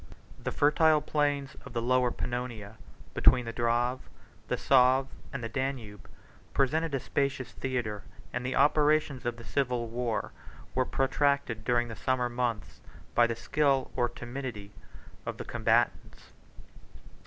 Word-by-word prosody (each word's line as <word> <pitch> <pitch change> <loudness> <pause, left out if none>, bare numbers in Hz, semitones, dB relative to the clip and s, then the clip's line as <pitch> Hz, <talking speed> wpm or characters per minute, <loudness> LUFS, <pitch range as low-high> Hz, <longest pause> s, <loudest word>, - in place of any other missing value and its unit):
The - - -1
fertile 155 +1 +4
plains 145 -2 0
80 - - -12
of - - -11
the 120 - -1
Lower 125 0 +3
Pannonia, 120 -4 -4 0.4
between 125 -1 +4
the 115 - -5
Drave, 120 +2 +1 0.5
the - - 0
Save, 130 0 +5 0.3
and 135 -3 -5
the - - -1
Danube, 120 -4 -4 0.5
presented 155 +3 +1
a - - 0
spacious 135 -2 -1
theatre; 120 -6 -3 0.3
and 125 - -2
the 130 +1 -2
operations 150 -2 +3
of 120 -1 -2
the 115 - -10
civil 125 -3 -1
war 120 -1 -2 0.4
were 130 0 +2
protracted 135 -4 +1
during 120 +1 +2
the 115 - -7
summer 125 0 0
months 120 -3 -3 0.3
by 120 0 +5
the 115 - -2
skill 140 +1 +1
or 120 -1 +1
timidity 120 -5 -6 0.5
of - - -5
the - - -6
combatants. - - 0
125 Hz, 140 wpm, -29 LUFS, 120-140 Hz, 0.5 s, Save